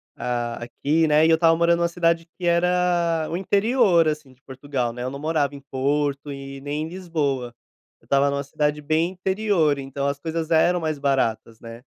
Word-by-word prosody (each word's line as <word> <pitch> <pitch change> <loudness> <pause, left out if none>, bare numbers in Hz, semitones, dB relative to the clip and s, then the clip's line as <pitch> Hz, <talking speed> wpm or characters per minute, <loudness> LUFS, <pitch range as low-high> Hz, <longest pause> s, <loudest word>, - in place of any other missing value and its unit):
ah, 120 -1 -3
aqui, 150 +6 0
né, 150 +1 +4
e - - +4
eu 160 - +6
estava 165 0 +4
morando 170 +1 +2
numa 170 - +2
cidade 170 -1 +1
que 180 - -4
era 170 -2 +1
o 165 - -3
interior, 200 -3 +3
assim, 150 -3 -3
de 130 - -30
Portugal, 130 -3 -4
né, 125 +1 -6
eu 130 - -2
não 140 - -7
morava 150 -2 0
em 140 - -8
Porto 140 +1 -2
e 135 0 -8
nem 145 +2 -3
em 160 - -4
Lisboa, 150 -9 -3 0.5
eu - - -26
estava 140 +1 +2
numa 140 0 -2
cidade 150 +1 -1
bem 155 +3 +1
interior, 190 -5 +1
então 140 0 -4
as 140 0 -2
coisas 160 +1 -3
eram 175 +2 +3
mais 155 -3 -2
baratas, 115 -5 -1
né. 115 +1 -11
150 Hz, 195 wpm, -23 LUFS, 140-170 Hz, 0.5 s, eu